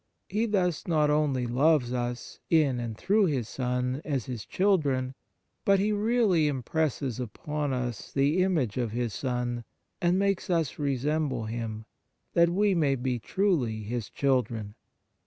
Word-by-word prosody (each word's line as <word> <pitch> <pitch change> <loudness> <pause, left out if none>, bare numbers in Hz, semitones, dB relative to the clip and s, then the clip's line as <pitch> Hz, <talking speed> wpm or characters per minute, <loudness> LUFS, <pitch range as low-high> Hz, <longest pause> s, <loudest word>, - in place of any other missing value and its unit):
He, 215 +4 0
thus, 180 -6 0
not 155 -3 +3
only 145 -4 +1
loves 130 +1 +2
us 120 0 -4
in 145 -6 +3
and 115 -2 -4
through 205 - +3
His 130 -8 -1
Son, 125 +2 -2
as 140 -6 -2
His 115 -5 -6
children, 140 - +1 0.5
but 200 0 +4
He 205 +2 +1
really 210 -6 +2
impresses 140 -2 -1
upon 145 +5 -3
us 125 -4 -3
the 145 +6 +2
image 155 - +1
of 120 -4 -1
His 120 -2 -1
Son, 125 -1 -2 0.4
and 175 +1 +3
makes 195 0 0
us 165 -5 0
resemble 140 -2 0
Him, 110 -1 -4 0.5
that 170 0 +5
we 200 +3 +2
may 150 -6 +2
be 125 -1 -2
truly 130 - 0
His 115 +1 -4
children. 115 -6 0
135 Hz, 145 wpm, -28 LUFS, 120-170 Hz, 0.5 s, that